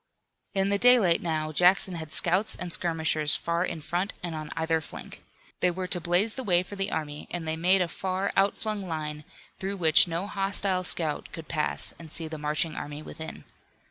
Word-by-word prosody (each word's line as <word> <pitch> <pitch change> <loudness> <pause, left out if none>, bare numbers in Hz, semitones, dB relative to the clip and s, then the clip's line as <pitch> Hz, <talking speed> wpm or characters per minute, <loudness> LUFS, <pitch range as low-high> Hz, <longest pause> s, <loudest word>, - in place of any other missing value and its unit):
In 195 0 +2
the 200 0 +1
daylight 235 -9 +5
now 155 -2 -2
Jackson 180 +3 +3
had 160 -2 -7
scouts 185 +7 +3
and 175 -2 -4
skirmishers 160 -3 +3
far 170 +1 -1
in 165 -3 -4
front 175 +6 -2
and 175 -2 -4
on 155 -1 -6
either 160 0 +1
flank. - - -10 0.4
They 180 - +3
were 185 +1 -3
to 180 -1 -2
blaze 180 +6 +2
the 260 - -5
way 180 -5 +2
for 205 - -9
the 195 0 -1
army 150 -1 -4
and 170 -2 -4
they 160 - -1
made 180 +3 +3
a - - -3
far 190 +3 -3
out 195 +1 +2
flung 215 -2 -3
line, 150 -2 -5 0.3
through 195 +1 -3
which 160 -1 +6
no 170 +3 -3
hostile 195 -2 0
scout 160 -4 -2
could 165 -1 -9
pass 155 -2 0
and 160 -2 -11
see 165 0 +2
the 155 -1 -7
marching 150 +2 -1
army 145 +1 -6
within. 160 0 -8
170 Hz, 200 wpm, -27 LUFS, 160-190 Hz, 0.4 s, which